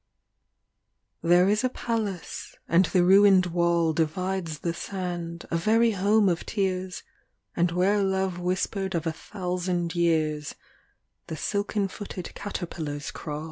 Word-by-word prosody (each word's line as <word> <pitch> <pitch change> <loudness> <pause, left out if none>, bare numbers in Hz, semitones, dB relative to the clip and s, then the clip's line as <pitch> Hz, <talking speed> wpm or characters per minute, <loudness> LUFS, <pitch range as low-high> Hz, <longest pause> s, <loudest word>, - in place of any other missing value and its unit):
LXVIII 165 - -3
There 180 +1 +6
is 210 +4 +2
a 255 - +2
palace, 220 -7 -4
and 170 +3 +4
the 180 +1 +2
ruined 195 0 +6
wall 170 -1 +2
Divides 165 0 -2
the 170 - -1
sand, 175 -2 -5
a 170 - +2
very 225 +6 +3
home 205 +1 +3
of 175 -2 0
tears, 185 -3 -2 0.5
And 175 +1 +2
whero 195 +4 +2
love 190 -2 0
whispered 185 +1 -1
of 165 -1 -1
a 165 - -1
thousand 180 -2 -3
years 155 -3 0 0.7
The 160 -2 -5
silken 205 +3 -1
footed 195 -2 -7
caterpillars 160 -7 -5
crawl. 150 -2 -5
180 Hz, 135 wpm, -26 LUFS, 170-195 Hz, 0.7 s, There